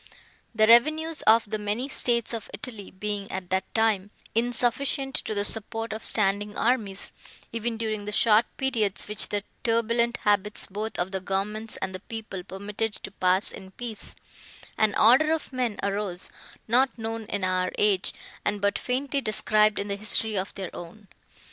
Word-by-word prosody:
The 215 Hz, -1 st, +5 dB
revenues 310 Hz, +8 st, +4 dB
of 220 Hz, 0 st, +6 dB
the 215 Hz, +1 st, -2 dB
many 210 Hz, +5 st, -2 dB
states 240 Hz, -4 st, +1 dB
of 225 Hz, -2 st, -5 dB
Italy 205 Hz, -1 st, -7 dB
being, 205 Hz, +1 st, -4 dB
at 185 Hz, -1 st, -5 dB
that 190 Hz, 0 st, 0 dB
time, 215 Hz, -3 st, +2 dB, 0.2 s
insufficient 245 Hz, +4 st, +1 dB
to 215 Hz, -, -3 dB
the 205 Hz, 0 st, 0 dB
support 225 Hz, +1 st, -4 dB
of 220 Hz, -, -6 dB
standing 205 Hz, 0 st, +1 dB
armies, 220 Hz, -5 st, 0 dB, 0.4 s
even 230 Hz, 0 st, -2 dB
during 215 Hz, -2 st, -2 dB
the 210 Hz, -, -4 dB
short 220 Hz, +2 st, +5 dB
periods, 225 Hz, -7 st, +1 dB
which 210 Hz, 0 st, +1 dB
the 205 Hz, -1 st, -1 dB, 0.2 s
turbulent 235 Hz, 0 st, +2 dB
habits 205 Hz, 0 st, +2 dB
both 210 Hz, +3 st, -4 dB
of 180 Hz, +2 st, -1 dB
the 190 Hz, -, -1 dB
governments 210 Hz, +4 st, -2 dB
and 190 Hz, 0 st, -3 dB
the 185 Hz, -, -5 dB
people 215 Hz, -3 st, -7 dB
permitted 205 Hz, +3 st, -3 dB
to 195 Hz, -, -8 dB
pass 185 Hz, 0 st, +2 dB
in 190 Hz, -1 st, -10 dB
peace, 230 Hz, -2 st, -7 dB, 0.6 s
an 215 Hz, -2 st, +2 dB
order 260 Hz, +8 st, +6 dB
of 315 Hz, -4 st, -4 dB
men 245 Hz, -5 st, -1 dB
arose 200 Hz, -3 st, -2 dB, 0.4 s
not 255 Hz, +4 st, +3 dB
known 225 Hz, 0 st, -4 dB
in 200 Hz, -2 st, -2 dB
our 185 Hz, 0 st, +1 dB
age, 200 Hz, -3 st, +3 dB, 0.3 s
and 205 Hz, -, 0 dB
but 200 Hz, 0 st, +1 dB
faintly 275 Hz, +2 st, -1 dB
described 215 Hz, -2 st, +2 dB
in 200 Hz, -, -2 dB
the 200 Hz, 0 st, -2 dB
history 215 Hz, +1 st, +2 dB
of 190 Hz, 0 st, -2 dB
their 190 Hz, -3 st, -6 dB
own. 195 Hz, +4 st, -10 dB
215 Hz, 165 wpm, -26 LUFS, 200-230 Hz, 0.6 s, of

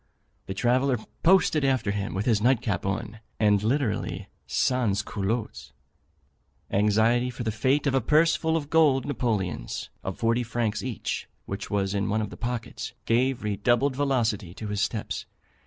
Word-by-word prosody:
The 95 Hz, -, -4 dB
traveller 125 Hz, +4 st, +2 dB, 0.2 s
posted 170 Hz, -4 st, +4 dB
after 130 Hz, -6 st, +1 dB
him 100 Hz, -1 st, -3 dB
with 100 Hz, +3 st, -1 dB
his 110 Hz, -4 st, +2 dB
night 125 Hz, +1 st, +4 dB
cap 105 Hz, -5 st, -2 dB
on, 105 Hz, +3 st, -3 dB, 0.2 s
and 105 Hz, -2 st, +4 dB
literally 120 Hz, +1 st, -1 dB, 0.2 s
sans 110 Hz, -6 st, +1 dB
culottes. 105 Hz, +3 st, -3 dB, 1.0 s
Anxiety 110 Hz, +4 st, +3 dB
for 125 Hz, 0 st, -6 dB
the 110 Hz, -, -1 dB
fate 130 Hz, +7 st, +1 dB
of 140 Hz, -, +2 dB
a 135 Hz, -, +3 dB
purse 155 Hz, +7 st, +4 dB
full 160 Hz, 0 st, 0 dB
of 150 Hz, -2 st, -5 dB
gold 145 Hz, -5 st, +4 dB
Napoleons, 105 Hz, -, -2 dB
of 95 Hz, -, -4 dB
forty 115 Hz, +1 st, +1 dB
francs 115 Hz, -2 st, -1 dB
each, 125 Hz, -4 st, -4 dB, 0.2 s
which 100 Hz, +2 st, -5 dB
was 100 Hz, -1 st, 0 dB
in 100 Hz, -1 st, 0 dB
one 110 Hz, +2 st, +1 dB
of 105 Hz, -2 st, -3 dB
the -, -, -8 dB
pockets, 120 Hz, -1 st, -4 dB
gave 125 Hz, +2 st, +1 dB
redoubled 120 Hz, +6 st, +1 dB
velocity 115 Hz, -10 st, 0 dB
to 110 Hz, -, -6 dB
his 105 Hz, 0 st, -1 dB
steps. 110 Hz, -2 st, -2 dB
115 Hz, 160 wpm, -26 LUFS, 105-130 Hz, 1.0 s, posted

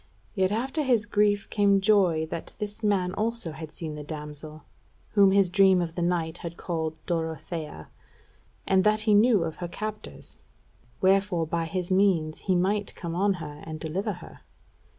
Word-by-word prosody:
Yet 190 Hz, -2 st, +1 dB
after 260 Hz, +8 st, -1 dB
his 245 Hz, -7 st, +2 dB
grief 205 Hz, -1 st, +2 dB
came 200 Hz, -2 st, +4 dB
joy 190 Hz, -6 st, +3 dB
that 165 Hz, -, -6 dB
this 210 Hz, +1 st, -6 dB
man 195 Hz, -4 st, +1 dB
also 225 Hz, -5 st, -2 dB
had 155 Hz, 0 st, -8 dB
seen 160 Hz, -2 st, -6 dB
the 150 Hz, 0 st, -7 dB
damsel, 150 Hz, 0 st, -8 dB, 0.5 s
whom 200 Hz, -2 st, +5 dB
his 195 Hz, -2 st, +3 dB
dream 190 Hz, -1 st, +5 dB
of 170 Hz, -2 st, -2 dB
the 175 Hz, -, -4 dB
night 170 Hz, -1 st, -1 dB
had 170 Hz, 0 st, -7 dB
called 160 Hz, -3 st, -3 dB
Dorothea, 160 Hz, -, -4 dB, 0.8 s
and 190 Hz, -1 st, +3 dB
that 215 Hz, 0 st, +3 dB
he 215 Hz, -1 st, +2 dB
knew 210 Hz, -2 st, +5 dB
of 160 Hz, -1 st, -4 dB
her 175 Hz, -, -4 dB
captors; 215 Hz, +4 st, -7 dB, 0.6 s
wherefore 190 Hz, -3 st, +3 dB
by 165 Hz, +1 st, -1 dB
his 180 Hz, +2 st, -3 dB
means 185 Hz, -5 st, +2 dB
he 185 Hz, -, 0 dB
might 200 Hz, +3 st, 0 dB
come 170 Hz, -2 st, -5 dB
on 195 Hz, +3 st, +2 dB
her 150 Hz, -4 st, -8 dB
and 155 Hz, -1 st, -7 dB
deliver 185 Hz, +7 st, -2 dB
her. 175 Hz, -, -12 dB
185 Hz, 170 wpm, -27 LUFS, 160-205 Hz, 0.8 s, whom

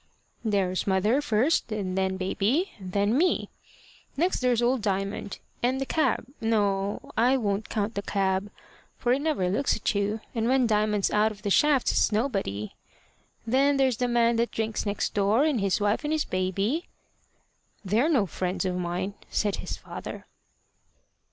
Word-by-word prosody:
"There's 195 Hz, -4 st, 0 dB
mother, 205 Hz, +8 st, +2 dB
first, 250 Hz, +1 st, +1 dB
and 195 Hz, -4 st, -2 dB
then 190 Hz, 0 st, 0 dB
baby, 215 Hz, -, 0 dB
and 185 Hz, -2 st, -8 dB
then 205 Hz, +4 st, +1 dB
me. 350 Hz, +6 st, +2 dB, 0.7 s
Next 350 Hz, +5 st, +1 dB
there's 250 Hz, -2 st, +2 dB
old 245 Hz, +1 st, +2 dB
Diamond 195 Hz, 0 st, -2 dB, 0.2 s
and 255 Hz, +2 st, +1 dB
the 270 Hz, -, -1 dB
cab 270 Hz, -6 st, 0 dB, 0.2 s
no, 205 Hz, -3 st, 0 dB
I 245 Hz, +4 st, +4 dB
won't 205 Hz, -3 st, -2 dB
count 215 Hz, 0 st, -1 dB
the 200 Hz, -, -2 dB
cab, 195 Hz, 0 st, 0 dB, 0.5 s
for 245 Hz, 0 st, +1 dB
it 265 Hz, -, +1 dB
never 295 Hz, -12 st, 0 dB
looks 210 Hz, +10 st, +1 dB
at 220 Hz, -, -1 dB
you, 205 Hz, +2 st, -1 dB
and 225 Hz, -1 st, 0 dB
when 260 Hz, -1 st, +3 dB
Diamond's 210 Hz, -2 st, +1 dB
out 215 Hz, +1 st, +3 dB
of 210 Hz, -1 st, -12 dB
the 200 Hz, -, -1 dB
shafts, 290 Hz, +3 st, +4 dB
it's -, -, +2 dB
nobody. 195 Hz, -, -1 dB, 0.7 s
Then 275 Hz, +4 st, +3 dB
there's 260 Hz, -4 st, +2 dB
the 250 Hz, -, 0 dB
man 235 Hz, -1 st, +2 dB
that 235 Hz, +1 st, +1 dB
drinks 220 Hz, -1 st, -2 dB
next 205 Hz, 0 st, -1 dB
door, 210 Hz, +5 st, +3 dB
and 295 Hz, -8 st, +1 dB
his 195 Hz, 0 st, +1 dB
wife, 205 Hz, +6 st, +1 dB
and 295 Hz, -, -2 dB
his 310 Hz, -1 st, +1 dB
baby." 195 Hz, -, -1 dB, 1.0 s
"They're 225 Hz, -, +2 dB
no 260 Hz, -11 st, +3 dB
friends 185 Hz, +2 st, -3 dB
of 180 Hz, -1 st, -1 dB
mine," 180 Hz, +2 st, -2 dB, 0.2 s
said 205 Hz, -2 st, 0 dB
his -, -, -5 dB
father. -, -, -8 dB
215 Hz, 165 wpm, -27 LUFS, 195-250 Hz, 1.0 s, I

